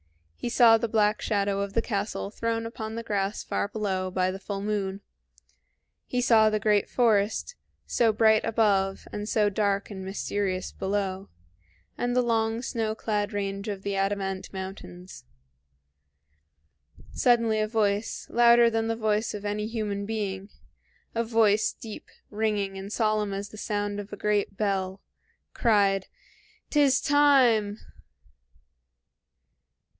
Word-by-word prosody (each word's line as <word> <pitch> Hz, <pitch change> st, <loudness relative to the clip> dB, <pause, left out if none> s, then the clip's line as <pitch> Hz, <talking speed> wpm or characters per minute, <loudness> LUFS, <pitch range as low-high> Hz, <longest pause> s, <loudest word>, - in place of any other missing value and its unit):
He -, -, -4 dB
saw 230 Hz, -2 st, +6 dB
the 235 Hz, -, -1 dB
black 215 Hz, -1 st, +2 dB
shadow 200 Hz, -1 st, 0 dB
of 200 Hz, 0 st, -4 dB
the 230 Hz, -, +2 dB
castle 200 Hz, -2 st, -3 dB
thrown 230 Hz, +1 st, -2 dB
upon 225 Hz, -1 st, -6 dB
the 230 Hz, -, -4 dB
grass 200 Hz, -2 st, -2 dB
far -, -, -2 dB
below 195 Hz, -3 st, -2 dB
by 185 Hz, 0 st, 0 dB
the 190 Hz, -, -7 dB
full 195 Hz, 0 st, -5 dB
moon; 200 Hz, -2 st, -2 dB, 1.1 s
he 250 Hz, -, -1 dB
saw 225 Hz, -3 st, +5 dB
the 215 Hz, 0 st, 0 dB
great 210 Hz, -1 st, +2 dB
forest, 220 Hz, -, +1 dB, 0.3 s
so 230 Hz, -2 st, +2 dB
bright 220 Hz, 0 st, +4 dB
above 200 Hz, -4 st, +1 dB
and 210 Hz, +1 st, -4 dB
so 210 Hz, -2 st, +2 dB
dark 200 Hz, 0 st, 0 dB
and 190 Hz, -2 st, -7 dB
mysterious 190 Hz, -1 st, -2 dB
below, 195 Hz, -1 st, -3 dB, 0.7 s
and 245 Hz, 0 st, 0 dB
the 250 Hz, -, +3 dB
long 225 Hz, 0 st, 0 dB
snow 225 Hz, -4 st, -2 dB
clad 210 Hz, -2 st, -2 dB
range 200 Hz, 0 st, -3 dB
of 200 Hz, -2 st, -4 dB
the 200 Hz, -1 st, -2 dB
Adamant 195 Hz, -1 st, -2 dB
Mountains. 190 Hz, -, -9 dB, 1.9 s
Suddenly 230 Hz, -3 st, +2 dB
a 215 Hz, -, +1 dB
voice, 210 Hz, -1 st, -1 dB
louder 235 Hz, 0 st, +5 dB
than 225 Hz, 0 st, 0 dB
the 225 Hz, -, 0 dB
voice 215 Hz, -1 st, 0 dB
of 205 Hz, 0 st, -7 dB
any 210 Hz, +1 st, -2 dB
human 210 Hz, -3 st, -3 dB
being, 200 Hz, -3 st, -3 dB, 0.6 s
a 230 Hz, -, 0 dB
voice 220 Hz, -2 st, +3 dB
deep, 220 Hz, -2 st, -10 dB, 0.2 s
ringing, 210 Hz, -2 st, -1 dB
and 195 Hz, +1 st, -8 dB
solemn 215 Hz, -2 st, 0 dB
as 200 Hz, +1 st, -5 dB
the 215 Hz, -, -12 dB
sound 205 Hz, -1 st, -2 dB
of 205 Hz, 0 st, -8 dB
a 205 Hz, -, -6 dB
great 205 Hz, -1 st, 0 dB
bell, 195 Hz, -2 st, -2 dB, 0.5 s
cried, 200 Hz, -4 st, +2 dB, 0.6 s
"'T 295 Hz, -, +3 dB
is 275 Hz, -2 st, +4 dB
time!" 255 Hz, -8 st, +4 dB
210 Hz, 140 wpm, -27 LUFS, 200-225 Hz, 1.9 s, saw